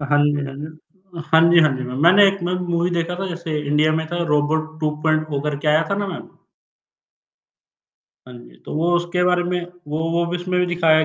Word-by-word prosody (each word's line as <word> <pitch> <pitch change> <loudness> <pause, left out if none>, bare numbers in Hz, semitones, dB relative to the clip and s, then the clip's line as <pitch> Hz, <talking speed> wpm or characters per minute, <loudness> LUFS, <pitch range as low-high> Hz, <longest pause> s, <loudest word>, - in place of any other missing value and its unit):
अ, 145 - -4
हाँ 145 - +4
जी, 145 - +3
हाँ 135 0 -7
जी। 150 +2 -6 0.6
हाँ 160 0 +6
जी, 175 - +5
हाँ 155 -2 +4
जी 130 - -5
मैम। 125 +1 -6
मैंने 195 +4 +7
एक 195 0 -2
मूवी 175 -1 -1
देखा 170 0 -2
था 195 - -2
जैसे 165 -3 -4
इंडिया 150 +2 +2
में 160 0 -1
था 175 0 -1
रोबोट 155 +2 0
2 150 - +2
पॉइंट 155 -1 +1
ओ 140 - -1
करके 150 +1 -2
आया 155 +2 +4
था - - +2
ना - - -3
मैम? - - -9 2.0
हाँ - - -11
जी, - - -16
तो - - -7
वो 170 +2 +1
उसके 175 +1 0
बारे 180 0 +2
में 180 0 -2 0.3
वो 150 +1 -3
वो 170 0 +1
भी 180 - -1
उसमें 180 +1 -2
भी 180 - +1
दिखाया 160 -2 +3
160 Hz, 225 wpm, -20 LUFS, 150-175 Hz, 2.0 s, मैंने